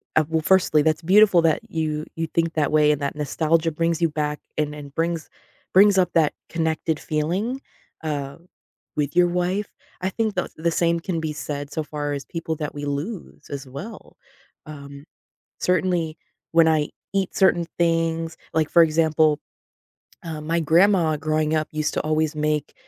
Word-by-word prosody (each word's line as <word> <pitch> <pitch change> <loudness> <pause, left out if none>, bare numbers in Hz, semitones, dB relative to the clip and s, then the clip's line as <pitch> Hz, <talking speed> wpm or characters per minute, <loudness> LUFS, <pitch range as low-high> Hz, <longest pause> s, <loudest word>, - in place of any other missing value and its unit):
uh, 155 - +5
well, 160 -1 +1
firstly, 155 -2 +4
that's 155 +1 +1
beautiful 190 0 +5
that 160 -2 +3
you 155 -1 -2
you 165 0 -2
think 165 +1 0
that 155 -2 0
way, 150 -1 +5
and 150 - -1
that 140 +1 -2
nostalgia 160 +3 +1
brings 165 +1 -1
you 165 - +3
back 150 -1 -2 0.2
and 150 -1 0
and 145 -2 -10
brings 165 -1 -2 0.4
brings 200 +1 +6
up 180 -2 +3
that 160 -3 +3 0.2
connected 160 -1 -1
feeling, 185 - -2 0.4
uh, 145 -2 -3 0.6
with 145 -1 -1
your 180 0 +5
wife. 180 +3 -1 0.3
I 185 - 0
think 215 0 -1
the 180 - -1
the 165 +1 0
same 170 0 +1
can 170 -1 -3
be 160 -1 -3
said 145 -1 -5
so 155 - -2
far 145 -1 -4
as 140 -1 -5
people 165 -1 -4
that 150 -1 -4
we 145 0 -5
lose 150 +4 -5
as 140 -1 -6
well. 140 - -9 0.5
Um, 140 -1 -10 0.6
certainly 175 -3 0 0.3
when 165 -1 +5
I 155 -2 +1 0.2
eat 195 -2 0
certain 175 -3 +3
things, 165 -1 0 0.2
like, 155 -1 +1
for 170 - +7
example, 155 -1 +3 0.8
uh, 160 -2 -5
my 165 +2 -1
grandma 165 0 +4
growing 155 +1 0
up 155 -1 0
used 155 -1 -1
to - - 0
always 155 0 0
make 150 0 -1
160 Hz, 170 wpm, -23 LUFS, 150-170 Hz, 0.8 s, for